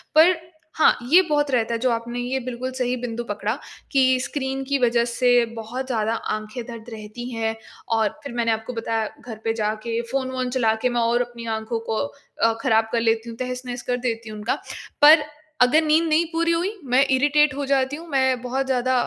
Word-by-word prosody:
पर 335 +4 +7 0.4
हाँ, 315 - +5
ये 360 +3 +8
बहुत 290 -1 +1
रहता 235 -2 +1
है, 230 - -1
जो 255 +2 +1
आपने 235 +1 -3
ये 250 +2 -1
बिल्कुल 255 0 -5
सही 250 -1 -1
बिंदु 240 -1 -4
पकड़ा, 210 +3 -2 0.3
कि 260 -1 +4
स्क्रीन 270 -1 -3
की 280 +1 0
वजह 235 -1 +3
से 245 -1 +4
बहुत 235 +4 -5
ज़्यादा 225 -3 0 0.2
आँखें 215 +3 -6
दर्द 230 -1 -9
रहती 220 +3 -7
हैं। 225 -1 -2 0.4
और 220 -2 +2
फिर 280 - -7
मैंने 235 -1 +1
आपको 220 +2 -3
बताया 225 -1 -1 0.2
घर 225 -3 -7
पे 225 - 0
जाके, 220 +1 -2
फ़ोन-वोन 260 -1 -1
चला 245 -3 +2
के, 250 - +3
मैं 240 -1 0
और 235 +1 +2
अपनी 240 -1 -6
आँखों 220 +1 -3
को 220 - 0 0.5
अ, 230 - +5
खराब 220 0 +2
कर 230 - +1
लेती 225 0 +1
हूँ, 230 - -8
तहस-नहस 250 -1 -4
कर 245 - +2
देती 230 -1 -3
हूँ 215 - -7
उनका। 220 +4 0 0.5
पर 300 +1 +9 0.4
अगर 250 +6 +6
नींद 310 +1 +4
नहीं 315 +2 +3
पूरी 335 0 +1
हुई, 345 +4 0
मैं 260 0 +4
इरिटेट 290 +2 +4
हो 285 0 -2
जाती 270 0 +1
हूँ, 330 +3 -10
मैं 260 -3 +2
बहुत 260 +2 -2
ज़्यादा 260 -1 +1
245 Hz, 200 wpm, -23 LUFS, 230-265 Hz, 0.5 s, पर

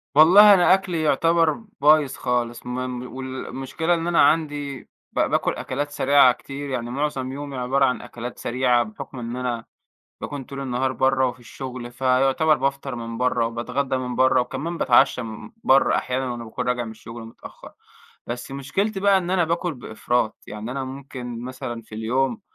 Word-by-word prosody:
والله 200 +7 +9
أنا 180 0 +5
أكلي 185 -4 0
يعتبر 165 +2 +3 0.3
بايظ 150 -2 +5
خالص، 120 -1 -2
م - - -6
م 125 -1 -5
والمشكلة 135 +5 -3
إن 165 0 -1
أنا 175 - +4
عندي 145 -2 +1 0.3
ب - - -2
باكل - - +1
أكلات 145 +3 -4
سريعة 140 -3 +5
كتير، 140 +3 -8
يعني 120 -3 -3
معظم 135 -1 -2
يومي 140 -1 -6
عبارة 135 +2 +2
عن 125 -1 0
أكلات 120 +1 -8
سريعة 125 0 +2
بحكم 110 +4 -9
إن 120 0 -5
أنا 125 -2 -3 0.6
باكون 145 -2 -5
طول 140 +1 -8
النهار 130 0 -1
برّه 130 0 +2
وفي 125 0 -6
الشغل، 125 0 -8
فيعتبر 135 +4 +2
بافطر 135 -1 -2
من 115 -1 -6
برّه 125 -2 +1
وباتغدى 125 +4 -2
من 125 -1 -4
برّه 130 -1 +4
وكمان 165 +7 -4
باتعشى 125 -1 +4
من 115 - -8
برّه 135 +1 +4
أحيانًا 130 0 -1
وأنا 120 -1 -6
باكون 110 - -5
راجع 125 -1 0
من 115 - -7
الشغل 115 +1 -10
متأخّر، 115 - -12 0.6
بس 120 +3 -5
مشكلتي 190 +10 -2
بقى 200 0 +4
إن 180 -1 -3
أنا 185 -2 +2
باكل 170 0 -1
بإفراط، 120 -1 -2
يعني 105 +3 -6
أنا 135 +1 -3
ممكن 130 -3 -7
مثلًا 125 -2 -6
في 110 -1 -12
اليوم 130 - -1
130 Hz, 170 wpm, -23 LUFS, 120-145 Hz, 0.6 s, والله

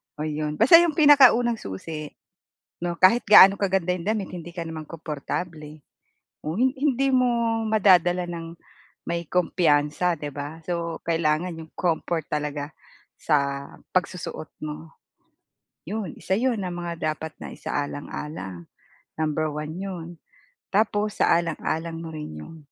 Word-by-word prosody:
Oh, 150 - -5
'yon 150 0 -2
basta 265 - +8
'yong 340 -3 +2
pinakaunang 255 -6 +6
susi 150 - -6 0.8
'no, 175 -1 -3
kahit 210 +6 +5
gaano 200 -2 +9
kaganda 190 -3 0
yung 170 - -7
damit 210 -1 -1
hindi 170 -1 -8
ka 170 -1 -6
naman 160 -1 -6
komportable. 155 0 -6 0.6
Oh, 155 +4 -4
hin 255 +2 +3
hindi 275 -1 +1
mo 235 -3 +2
madadala 180 -4 +4
ng 170 -1 -7 0.5
may 170 -1 -3
kumpiyansa, 170 -1 +2
'di 145 -1 -6
ba? 145 +3 -7
So, 170 -2 -3
kailangan 165 +1 0
'yong 160 -1 -13
comfort 165 -2 -1
talaga 150 0 -3 0.5
sa 140 -2 0 0.2
pagsusuot 180 -4 -2 0.2
mo, 155 +2 -8 0.9
'yon 205 -2 -5
isa 190 - -1
'yon 240 +1 +1
na 180 - -4
mga 170 -3 -3
dapat 160 +1 -7
na - - -8
isaalang-alang 145 - -5 0.5
number 155 0 0
1 150 +1 -5
'yon. 185 -3 -5 0.6
Tapos 210 0 +1
isaalang-alang 165 -1 0
mo 165 -1 -7
rin 150 - -7
yung 165 - -12
170 Hz, 130 wpm, -25 LUFS, 155-195 Hz, 0.9 s, gaano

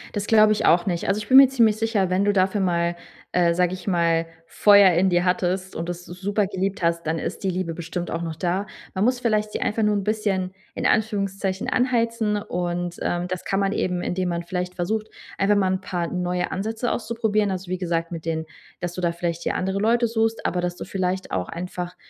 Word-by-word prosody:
Das 205 0 -2
glaube 215 -1 +6
ich 215 - -1
auch 175 +3 +4
nicht. 175 -3 -2
Also, 195 - +2
ich 210 -1 -5
bin 265 - +7
mir 270 -1 +10
ziemlich 230 -5 +3
sicher, 220 -5 0
wenn 190 +2 +2
du 205 0 +2
dafür 195 +1 +2
mal, 170 -1 +1 0.4
äh, 170 -1 +3
sage 180 0 +2
ich 185 - -8
mal, 165 -2 +2 0.2
Feuer 200 +1 +6
in 180 +3 +3
dir 175 0 +2
hattest 185 +1 0
und 170 +1 -4
das 175 0 -6
s 180 +1 -10
super 205 +1 +1
geliebt 190 -1 -3
hast, 170 -1 0
dann 160 - 0
ist 170 - -5
die 190 - +1
Liebe 180 -2 -2
bestimmt 170 +1 -5
auch 165 - -2
noch 165 -2 -4
da. 185 +4 -1 0.3
Man 190 +2 +1
muss 250 0 +2
vielleicht 215 -3 0
die - - -2
einfach 220 +1 -1
nur 210 -1 +3
'n 200 - -1
bisschen 195 -3 -1 0.2
in - - -3
Anführungszeichen 195 -3 0
anheizen 230 -4 +1
und, 175 -2 -3
ähm, 175 0 -1
das 185 -1 -4
kann 195 - -1
man 195 0 +1
eben, 180 -3 -1
indem 180 0 -1
man 170 0 -2
vielleicht 180 +1 -4
versucht, 215 +5 -2 0.3
einfach 200 +1 +3
mal 190 -2 +2
'n 185 - -2
paar 175 -2 -3
neue 180 0 -1
Ansätze 225 +5 -2
auszuprobieren. 220 -3 0
Also, 185 -1 -4
wie 185 - -2
gesagt, 170 -1 -2
mit 165 -2 -6
denen, 160 -1 -2 0.4
dass 175 -1 -3
du 180 - -5
da 170 -1 +1
vielleicht 170 -1 -3
dir - - 0
andere 190 +1 -1
Leute 235 +3 +3
suchst, 225 0 -1
aber 180 - 0
dass 175 0 -2
du - - -7
vielleicht 185 0 -2
auch 90 -1 -2
einfach 180 +1 -5
185 Hz, 230 wpm, -23 LUFS, 175-210 Hz, 0.4 s, mir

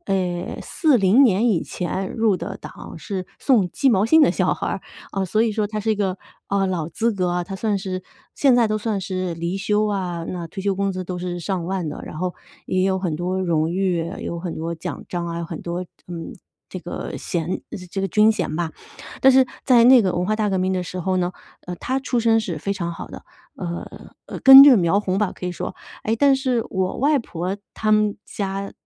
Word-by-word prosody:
呃 180 -2 -2
40 245 - +4
年 225 -2 +4
以 195 -8 +2
前 190 +1 -4
入 220 -3 +2
的 190 +3 -5
党， - - -10
是 185 +2 -5
送 215 -10 +2
鸡 270 +7 +2
毛 205 0 +3
信 320 +5 +6
的 - - +5
小 - - +1
孩 - - -4
儿， - - -3 0.3
啊， 195 - -2
所 215 +4 +1
以 230 -2 +1
说 210 0 0
他 215 +1 -4
是 220 +1 -1
一 - - +3
个， 195 -3 -1 0.3
啊， 200 0 +1
老 175 -5 -2
资 225 +7 0
格 185 -3 -1
啊， 175 0 -1
他 195 - -7
算 210 +1 0
是 185 -1 -4 0.3
现 265 -4 +4
在 235 - +4
都 215 0 -1
算 215 -1 -2
是 185 -2 -3
离 170 +3 -3
休 210 +2 +1
啊， 180 -4 -2
那 175 -2 -5
退 190 +4 -7
休 200 -1 +1
工 195 0 0
资 185 0 -4
都 180 0 -5
是 175 0 -4
上 175 -1 -3
万 185 -2 -2
的， - - -7
然 - - -8
后 180 +2 -2 0.3
也 185 0 0
有 190 -1 +1
很 180 -4 -2
多 180 +4 -2
荣 165 -3 +1
誉， 175 -2 0
啊 190 - -7
有 170 - -4
很 175 -2 -4
多 165 +1 -3
奖 160 - -6
章 175 -1 -3
啊， 170 0 -4
有 - - -3
很 165 -1 -7
多 175 +1 -4
这， - - -25 0.2
嗯， 170 -2 -6 0.4
这 185 - -5
个 175 +1 -6
衔， 170 +1 -3
呃， - - -6
这 195 - -3
个 195 - -1
军 215 +4 +4
衔 185 -7 -3
吧。 170 -2 -2 0.5
但 265 - +7
是 265 -1 +5 0.2
在 240 -3 +5
那 255 0 +8
个 190 -5 +1
文 175 +1 0
化 215 +3 +1
大 215 -1 0
革 190 - 0
命 185 +1 0
的 185 -1 -1
时 180 +1 -6
候 185 +1 0
呢， 175 0 0 0.4
呃， 180 0 -5
他 260 +9 -2
出 255 -3 -1
身 225 -1 +3
是 175 -7 -4
非 195 +6 -2
常 170 -3 -3
好 165 - -8
的， - - -10 0.3
呃， 175 -2 -7
呃， - - -7
根 270 0 +11
正 270 -6 +8
苗 175 +2 +2
红 195 -2 -1
吧 210 -3 0
可 - - -9
以 180 - -2
说。 - - -6 0.3
诶， 220 +1 +1
但 275 +3 +5
是 255 -3 0
我 190 -1 -1
外 290 +1 +3
婆 185 -3 -4 0.2
她 215 -1 +1
们 210 -1 +2
家 195 0 -4
190 Hz, 250 characters per minute, -22 LUFS, 175-215 Hz, 0.5 s, 根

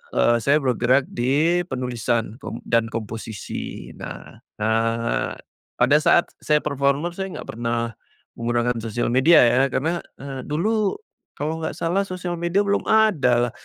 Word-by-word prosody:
eee, 120 0 +4
saya 140 +2 +4
bergerak 130 +1 +2
di 150 +8 +1
penulisan 120 -3 -1
kom - - -6
dan 115 -1 +2
komposisi, 110 -2 -6
nah - - -9 0.2
nah, 115 +1 0 0.5
pada 135 +5 +5
saat 170 - +4
saya 150 0 +3
performer, 140 +3 0
saya 190 -1 -4
enggak - - -8
pernah 115 -1 -1 0.5
menggunakan 120 0 0
sosial 115 +1 -2
media 140 +6 +6
ya, 125 +2 +4
karena, 165 +6 0 0.2
eee, 135 -1 -6
dulu, 205 +7 +1 0.4
kalau 155 +2 -3
enggak 160 - -3
salah 180 +4 0
sosial 180 -1 -4
media 175 +4 +1
belum 200 0 0
ada 140 - +3
lah. - - -14
130 Hz, 140 wpm, -23 LUFS, 120-170 Hz, 0.5 s, media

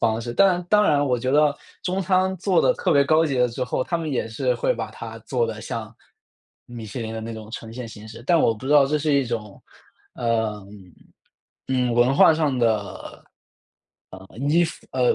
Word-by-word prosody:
方 110 -1 +1
式。 120 +1 -5
但 180 +4 +3
当 210 0 +5
然 180 - +3
了， 145 - +2
我 125 -2 +1
觉 130 +2 -2
得 150 +1 +4 0.3
中 185 +1 -1
餐 185 0 +1
做 185 -1 +2
得 - - +4
特 - - 0
别 140 0 +5
高 155 +3 +3
级 140 -3 -2
了 125 - +4
之 120 +2 -5
后， 125 +1 -1
他 170 - -2
们 160 -2 -4
也 125 -5 -1
是 125 +3 -1
会 120 - 0
把 115 -2 -5
它 115 0 -9
做 120 +1 -1
得 110 -2 -6
像 115 0 -6 0.7
米 120 -2 -9
其 105 - -7
林 110 -1 -5
的 110 - -5
那 115 0 -6
种 110 0 -10
呈 115 -1 -8
现 125 0 -6
形 110 -1 -11
式。 115 +1 -11
但 170 0 +4
我 115 - +3
不 110 - -12
知 145 - +1
道 145 -2 +6
这 150 +2 0
是 150 0 0
一 140 -2 +2
种， 110 -4 -6 0.5
呃， 110 -3 -1 1.0
嗯， 125 -2 +1
文 120 +3 +3
化 150 - +7
上 150 -5 0
的， 110 -4 -2 1.7
呃， - - +2
依 - - +5
附 - - -4
125 Hz, 230 characters per minute, -23 LUFS, 115-150 Hz, 1.7 s, 化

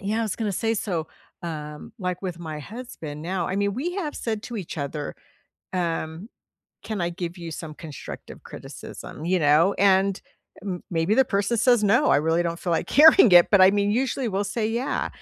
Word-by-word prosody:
yeah, 210 +3 -1
I - - +1
was 215 -4 -2
gonna 215 -3 -2
say, 225 +4 0
so, 175 -7 -3 0.3
um, 150 -3 -7
like 180 -2 -3
with 180 -3 -4
my 160 -3 -6
husband 160 - -8
now 180 +1 -2
I 185 - -2
mean, 200 0 0
we 330 +9 -3
have 315 -7 -3
said 220 -2 -3
to 240 - -6
each 185 -6 -6
other, 145 +1 -4 0.6
um, 170 +1 -3 0.5
"Can 215 -3 -4
I 170 0 0
give 175 0 -6
you 170 -1 -7
some 155 -1 -7
constructive 150 -2 -9
criticism," 155 - -9
you 185 +2 +2
know? 155 +5 +4
And 195 0 +3 0.4
m 185 -3 -4
maybe 165 +4 +1
the 265 - +5
person 205 -1 0
says, 240 -1 +4
"No, 230 +9 +4
I - - +5
really 160 +3 +2
don't 170 -1 -3
feel 175 - -2
like 165 - -1
hearing 310 - +8
it," 175 -1 +8
but, 200 - +6
I 185 - +8
mean, 205 0 +1
usually, 260 +2 0
we'll 200 0 -1
say, 220 -2 +1
"Yeah." 235 +4 -1
190 Hz, 200 wpm, -24 LUFS, 165-220 Hz, 0.6 s, hearing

